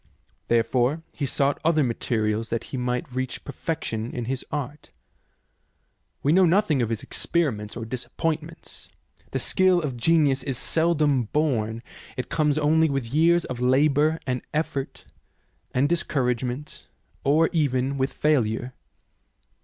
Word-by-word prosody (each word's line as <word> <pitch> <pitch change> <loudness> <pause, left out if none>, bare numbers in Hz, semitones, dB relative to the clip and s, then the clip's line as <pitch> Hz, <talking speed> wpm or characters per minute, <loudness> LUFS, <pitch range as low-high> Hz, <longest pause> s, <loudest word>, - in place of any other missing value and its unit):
Therefore 120 +6 +1
he 140 - -2
sought 140 +1 0
other 155 -2 +3
materials 115 -2 -1
that 115 - -2
he - - 0
might 125 0 -2
reach 130 0 -4
perfection 125 -6 -4
in 120 -2 -4
his 130 +1 -3
art. 145 0 -5 1.3
We 145 - +3
know 190 +2 +6
nothing 165 -6 +3
of 115 - 0
his 115 -1 -3
experiments 115 -11 -1
or 115 - -5
disappointments. 155 +7 -4 0.4
The - - -2
skill 185 -2 +3
of 140 -7 -3
genius 140 0 +3
is 130 -1 -3
seldom 150 -4 +2
born; 115 -5 -1 0.3
it 125 - -4
comes 150 -1 +1
only 155 +1 +3
with 135 -3 -1
years 170 +3 +4
of 125 - -5
labour 145 +5 +3
and 125 -2 -1
effort 140 -3 -3 0.7
and 130 +3 +2
discouragement, 130 -4 -2 0.4
or 155 +4 +3
even 140 -4 +1
with 130 +1 0
failure. 125 -4 0
135 Hz, 130 wpm, -25 LUFS, 125-155 Hz, 1.3 s, know